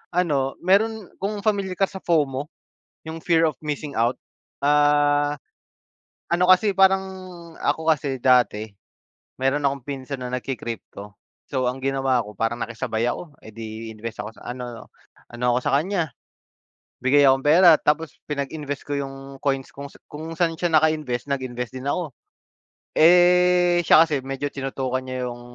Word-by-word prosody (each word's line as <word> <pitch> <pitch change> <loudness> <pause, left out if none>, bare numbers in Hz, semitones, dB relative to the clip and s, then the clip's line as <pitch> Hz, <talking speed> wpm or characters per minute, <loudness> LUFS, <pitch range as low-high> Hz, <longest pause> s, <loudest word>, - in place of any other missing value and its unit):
ano, 145 -7 +1
meron 210 +2 +2
kung 205 +2 -2
familiar 200 -3 0
ka 195 - +2
sa 190 - -8
FOMO, 145 -4 0 0.6
yung 160 +1 -6
fear 165 -1 +3
of 155 - -4
missing 150 -1 -4
out. 120 +2 +2 0.5
Ah, 145 0 +3 1.0
ano 175 +1 +2
kasi 200 +2 +5
parang, 190 0 +5 0.6
ako 160 +2 -1
kasi 135 -3 -2
dati, 120 -4 +3 0.7
meron 135 +2 +1
akong 140 -2 -1
pinsan 135 -1 -5
na 125 - -5
nagki-crypto 115 -5 -6 0.4
so, 130 -3 -1
ang 130 - -5
ginawa 135 -2 +1
ko 105 - -10
parang 115 +3 -1
nakisabay 115 0 -2
ako. 155 +1 -6
Eh, 110 - -12
di 110 0 -7
invest 110 +1 -7
ako 110 +2 -8
sa - - -15
ano 125 -2 -8 0.4
ano 120 +1 -4
ako - - +2
sa - - 0
kanya, 175 -4 -2 0.9
bigay 145 +2 +5
akong 135 0 +3
pera. 165 +2 +7
Tapos 155 +2 0
pinag-invest 145 0 -4
ko 145 - -2
yung 135 0 -6
coins 135 -2 0
kung 140 0 -7 0.2
kung 160 +2 -7
saan 165 -1 +1
siya 175 0 -1
naka-invest, 155 -5 +1
nag-invest 125 -2 -4
din 130 +2 -6
ako. 170 -6 -3 0.9
Eh, 180 +1 +5
siya 160 - +8
kasi 150 -4 -1
medyo 135 +1 -3
tinutukan 130 -1 -3
niya 130 0 -4
yung, 120 0 -9
140 Hz, 150 wpm, -23 LUFS, 130-165 Hz, 1.0 s, siya